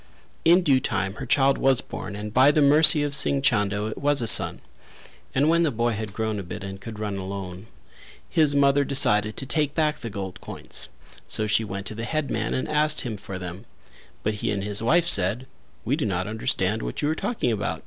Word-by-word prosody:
In 175 +3 +5
due 140 -5 +3
time 95 -7 -2
her 130 - -5
child 135 +2 +3
was 135 -1 +3
born 100 +1 -7
and 105 +1 -7
by 130 +3 +5
the 150 - +2
mercy 150 +1 +6
of 145 -1 -2
Singh 140 -1 +2
Chando 105 -5 +1
it 110 - -5
was 145 0 +1
a 120 - 0
son; - - +5 0.8
and 140 +3 +2
when 170 +1 +3
the 165 - +2
boy 120 -1 -1
had 110 -1 -5
grown 110 0 -3
a - - -5
bit 100 +3 -8
and 95 0 -8
could 115 0 -8
run 105 -2 -4
alone 95 0 -7 0.6
his 155 -4 +2
mother 140 0 +3
decided 110 -6 +2
to 135 - -2
take 145 +2 -1
back 155 -2 0
the 115 - -6
gold 95 -2 -7
coins, - - -7 0.4
so 110 - +2
she 110 +1 +1
went 100 -2 -6
to 110 - -5
the 115 +2 -5
headman 135 -7 -2
and 130 - -2
asked 150 0 +2
him 120 -5 -4
for 95 -1 -8
them; 90 +4 -8 0.6
but 110 - 0
he - - -1
and 100 -2 -2
his 105 +1 -2
wife 170 +9 +2
said: 105 - +2 0.4
"We - - +1
do - - -2
not 90 -2 -2
understand 110 -1 -1
what - - -5
you 145 - +1
are - - +1
talking 195 - -2
about? 90 -7 -3
115 Hz, 220 wpm, -24 LUFS, 100-140 Hz, 0.8 s, mercy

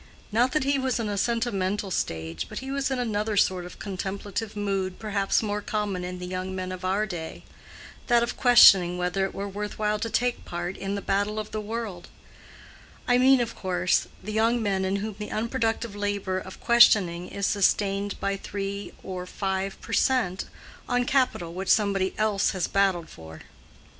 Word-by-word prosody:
Not 245 +4 +2
that 305 - +2
he 275 0 +1
was 260 -2 0
in 220 -2 -2
a 205 - -2
sentimental 205 -3 -1
stage; 80 - -3
but - - -8
he 265 0 -5
was 275 0 0
in 265 - -1
another 215 -3 -1
sort 185 -2 +2
of 180 - -10
contemplative 200 +2 -4
mood 195 -3 -2
perhaps 200 -1 0
more 210 -1 -2
common 205 -3 -2
in 180 0 -5
the 180 - -6
young 185 +1 -4
men 185 0 -4
of 185 0 -7
our 195 +3 +1
day—that 210 +6 -4
of 235 - -3
questioning 195 -8 +7
whether 180 +2 0
it 195 - -5
were 200 - -3
worth 205 +1 -5
while 210 0 0
to 230 - -2
take 245 +2 0
part 175 +2 -4
in 195 +1 -3
the 200 - -4
battle 205 +2 0
of 215 0 -4
the 215 - -3
world: 210 -4 -5 1.0
I 245 0 +4
mean, 260 0 +6
of 230 -1 -3
course, 180 -1 +1 0.2
the 215 +2 -5
young 225 +2 +2
men 195 -2 0
in 190 +1 0
whom 205 0 -4
the 210 - -5
unproductive 225 -1 -1
labor 205 -2 -1
of 190 0 -10
questioning 190 -7 +5
is 200 0 -3
sustained 200 0 +1
by 195 0 -1
three 200 0 -5
or 180 -1 -5
five 190 0 -3
per - - -7
cent, 230 -9 +1 0.4
on 245 0 +2
capital 250 -11 +1
which 185 +1 -4
somebody 200 -3 +2
else 215 -2 +2
has 185 -3 -1
battled 190 -4 +1
for. 80 -1 -12
200 Hz, 185 wpm, -26 LUFS, 185-220 Hz, 1.0 s, questioning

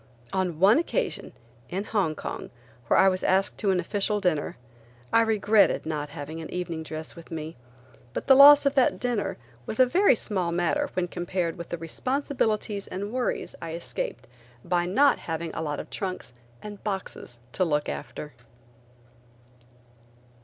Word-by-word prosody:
On 185 -4 -1
one 205 - +6
occasion–in 130 - -4
Hong 195 -8 0
Kong, - - -6 0.4
where - - +4
I 190 - +6
was 185 -1 +1
asked 190 +1 +1
to 205 - +1
an 185 -1 +3
official 205 +3 -1
dinner–I 120 - -2
regretted 215 -4 +3
not 150 -2 -3
having 145 +3 -7
an 160 - -7
evening 175 -3 -4
dress 155 0 -7
with 170 - -12
me, 160 0 -6 0.6
but - - -4
the 270 - +7
loss 285 +2 +9
of 280 - +3
that 265 -3 +3
dinner 245 -4 -1 0.3
was 220 - -4
a 255 - +8
very 360 +5 +4
small 185 -6 -2
matter 175 0 0
when 180 -1 0
compared 175 -1 -2
with 170 -1 -8
the 170 - -3
responsibilities 215 - -2
and 200 +3 -5
worries 255 -1 -2
I 165 -1 -5
escaped 460 - -4 0.4
by 175 0 +1
not 275 +10 +4
having 165 0 -4
a - - -3
lot 150 -2 -3
of - - -8
trunks 185 - -4 0.3
and 205 -1 -9
boxes 190 - -5
to 185 - +1
look 150 -4 0
after. 150 -1 -6
185 Hz, 155 wpm, -26 LUFS, 160-215 Hz, 0.6 s, loss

